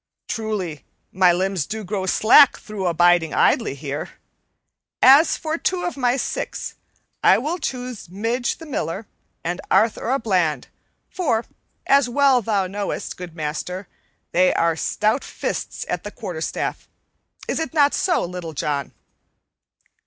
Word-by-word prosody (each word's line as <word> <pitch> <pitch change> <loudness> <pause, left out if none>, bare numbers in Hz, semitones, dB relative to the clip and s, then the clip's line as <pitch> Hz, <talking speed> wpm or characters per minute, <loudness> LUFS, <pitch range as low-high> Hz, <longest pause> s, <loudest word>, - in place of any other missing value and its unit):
Truly, 195 - -3 0.3
my 185 -1 +4
limbs 185 -2 -1
do 220 +1 -4
grow 190 -1 -3
slack 250 +9 +6
through 210 -5 -4
abiding 175 -1 +3
idly - - +2
here. 145 +1 -5 0.9
As 280 +5 +6
for 320 +1 -3
two 365 -1 -1
of 350 - -2
my 250 -2 +1
six, - - -4 0.5
I - - +6
will 325 +6 -2
choose 250 - -5
Midge 230 +6 -1
the 325 - -10
Miller 205 - -3 0.4
and 175 +2 -3
Arthur 225 +1 +2
a 265 - +3
Bland, 180 - 0 0.4
for, 240 -11 0 0.4
as 275 -2 +4
well 270 -1 +4
thou 205 -3 0
knowest, 200 +2 -4
good 180 -2 -9
master, 160 +5 -4 0.4
they 180 +1 +4
are 165 -1 +2
stout 215 - 0
fists - - -4
at 180 - -3
the 205 - -5
quarterstaff. 185 -8 -4 0.6
Is - - -1
it 320 - -3
not 290 -3 +4
so, 355 - +1
Little 175 -2 -6
John?" 140 -1 -2
205 Hz, 140 wpm, -22 LUFS, 175-250 Hz, 0.9 s, slack